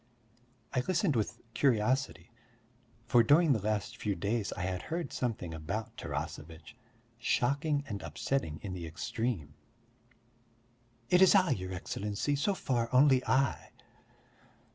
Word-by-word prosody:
I - - +2
listened 180 -4 +2
with 115 +1 -1
curiosity 130 0 +1 0.7
for 120 0 +5
during 145 +5 +5
the 110 - -1
last 105 +3 -2
few 105 -4 -1
days 100 +4 -1
I - - -6
had 90 -1 -2
heard 170 +1 -4
something 105 -9 -3
about 90 +8 -4
Tarasevitch 80 +7 -6 0.4
shocking 140 +4 +1
and 100 -2 -5
upsetting 85 - -2
in 95 -3 -4
the 85 -2 -5
extreme. 90 -1 -3 1.6
"It's 180 +1 +7
I, 185 -5 +5
your 95 -7 -2
Excellency, 100 +8 -2
so 195 +8 0
far 120 -8 -1
only 130 0 +5
I." 135 +1 +1
120 Hz, 120 wpm, -31 LUFS, 100-140 Hz, 1.6 s, It's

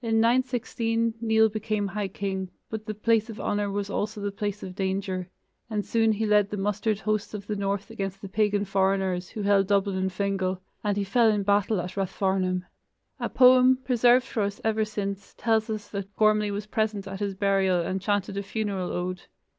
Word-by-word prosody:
In 225 -1 +2
916 230 -1 +1
Nial 220 -1 +4
became 215 -1 -2
high 200 +1 -2
king, 190 -1 -3 0.2
but 220 -1 -5
the 215 - -3
place 225 +1 +2
of 220 - -7
honor 205 0 -1
was 200 0 -2
also 210 +1 -3
the 205 0 -2
place 205 +1 -4
of 185 - -6
danger, 190 -1 -2 0.4
and 210 -2 -2
soon 225 -1 +2
he 220 +1 -1
led 210 -1 +3
the 210 - -4
mustered 210 +1 0
hosts 215 +1 -1
of 200 -1 -6
the 210 - -3
north 200 +1 -2
against 195 -3 -4
the 195 - -7
pagan 205 0 +1
foreigners, 190 -2 0
who 210 - -5
held 200 -1 +3
Dublin 200 -1 +1
and 190 0 0
Fingal, 190 -1 -1 0.2
and 205 -1 0
he 200 - +1
fell 225 +4 +3
in 210 -2 +1
battle 205 0 +2
at 180 +1 -5
Rathfarnham. 190 -1 0 0.6
A - - -2
poem, 255 0 +6
preserved 250 0 +4
for 230 - -2
us 200 0 -2
ever 220 -1 +1
since, 200 -2 -5
tells 220 0 +1
us 215 -1 -4
that 200 -1 -6
Gormlai 215 -1 +3
was 205 +1 -3
present 215 -2 -1
at 195 0 -6
his 200 -2 -2
burial 195 -2 +2
and 185 +3 -2
chanted 200 0 -1
a - - 0
funeral 195 -2 -3
ode. 180 0 -3
205 Hz, 195 wpm, -26 LUFS, 195-220 Hz, 0.6 s, poem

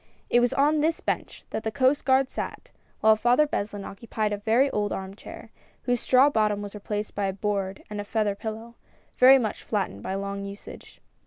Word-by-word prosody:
It 240 - +5
was 245 0 +2
on 300 +2 +3
this 315 +2 +1
bench - - -4
that - - -3
the 220 - -1
Coast 260 +4 +1
Guard 265 0 +4
sat, - - -6 0.3
while 220 0 +6
Father 245 +6 +3
Beslin 205 -7 -4
occupied 215 0 -3
a - - -2
very 225 +6 +3
old 205 -1 -1
arm 190 0 -5
chair, - - -11 0.3
whose 245 -1 0
straw 260 +4 +5
bottom 210 -6 +1
was 205 - -7
replaced 210 0 -4
by 200 -1 -1
a 190 - -2
board 195 -1 -3
and 210 -1 -5
a - - -5
feather 210 -1 0
pillow, 220 +3 -7 0.5
very 260 +2 +9
much 220 -5 -2
flattened 190 - -3
by 190 - -3
long 200 0 -4
usage. 200 0 -10
215 Hz, 195 wpm, -26 LUFS, 200-245 Hz, 0.5 s, very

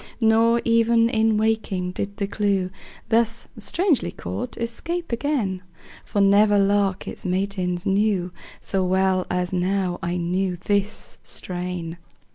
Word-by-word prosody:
Nor 230 +1 +4
even 230 0 +4
in 220 -2 +2
waking 215 -4 0
did 200 +2 -5
the 200 - -1
clew, 195 -2 0 0.4
Thus 230 0 +2
strangely 350 -6 +1
caught, 250 0 -6
escape 330 +9 -3
again; 235 -8 -1 0.4
For 205 - -2
never 205 +1 +5
lark 200 -1 +1
its - - -6
matins 185 -2 -1
knew 195 -2 +1 0.3
So 195 -1 -1
well 185 0 +1
as 180 0 -1
now 185 0 0
I 175 -1 -2
knew 180 +2 -1
this 205 +2 -1
strain. 175 -2 -4
200 Hz, 125 wpm, -23 LUFS, 185-225 Hz, 0.4 s, never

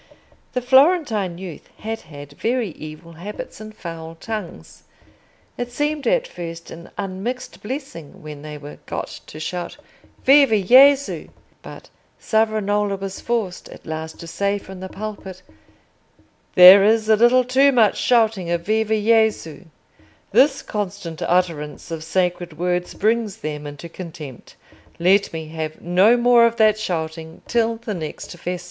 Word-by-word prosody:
The 250 - -2
Florentine 260 - +3
youth 180 -4 -9
had 225 +1 -5
had 145 -2 -12
very 230 - -1
evil 155 +1 -10
habits 195 +6 -8
and 215 0 -10
foul 165 -1 -8
tongues: 185 - -7 0.8
it 245 0 -4
seemed 295 +2 -2
at - - +2
first 165 - -8
an 170 +1 -10
unmixed 200 +6 -5
blessing 215 - -7
when 150 -2 -9
they 150 0 -8
were 145 0 -11
got - - -5
to 155 - -10
shout 175 +2 -5 0.5
"Viva 275 -4 +6
Gesù!" 265 +7 +5 0.3
But - - -12 0.3
Savonarola 210 -2 0
was 195 0 -6
forced 225 -7 -3
at - - -13
last 160 0 -6
to - - -8
say 200 +4 -1
from 190 -1 -11
the 190 0 -7
pulpit, 190 -3 -8 1.1
"There 185 +2 +10
is 220 +1 +3
a 220 - +6
little 240 +3 +5
too 265 +3 +4
much 230 -6 +4
shouting 220 -7 +2
of 170 0 0
'Viva 220 +2 +1
Gesù!' 215 -7 +1 0.7
This 275 +2 +4
constant 200 -5 -5
utterance 165 -3 -1
of 160 -1 -5
sacred 175 -1 -1
words 180 +1 -2
brings 220 -1 0
them 150 -6 -5
into 145 +3 -9
contempt. 160 -7 -10 0.4
Let 195 +4 +3
me 160 -1 -6
have 155 -1 -5
no 185 +7 +4
more 240 -1 +5
of 230 - -2
that 215 -1 +3
shouting 160 -4 -5
till 230 -1 +1
the 225 -1 -6
next 165 0 -7
Festa." 180 +1 -4
195 Hz, 145 wpm, -21 LUFS, 165-225 Hz, 1.1 s, There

